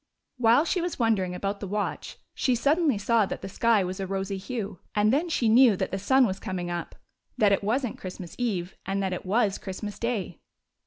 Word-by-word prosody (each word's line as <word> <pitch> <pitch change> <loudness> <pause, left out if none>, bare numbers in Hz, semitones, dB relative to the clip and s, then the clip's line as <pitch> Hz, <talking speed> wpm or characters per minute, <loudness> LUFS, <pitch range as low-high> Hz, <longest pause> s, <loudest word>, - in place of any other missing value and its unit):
While 240 +5 +4
she 360 +1 0
was 350 0 -3
wondering 205 -7 +1
about 200 +2 -3
the 200 - -5
watch, 205 +2 -3 0.2
she 255 - +1
suddenly 285 +1 +2
saw 215 0 +2
that - - -6
the - - -4
sky 220 +1 +2
was 185 +2 -4
a 190 - -3
rosy 195 +1 -2
hue, 200 -2 -5 0.2
and 210 +2 +3
then 320 +5 +1
she 245 -7 +1
knew 230 -2 +6
that - - -2
the 195 - -2
sun 260 +6 +4
was 190 -3 -2
coming 180 -2 -4
up; 175 -1 -5 0.4
that 210 -2 +4
it 200 - +2
was 245 +6 +1
n't 230 - -6
Christmas 180 -2 -8
eve, 190 -7 -2
and 195 0 -2
that 190 -1 -1
it 180 - -6
was 205 0 +1
Christmas 205 +2 -6
day. 225 -8 -2
205 Hz, 215 wpm, -27 LUFS, 190-240 Hz, 0.4 s, knew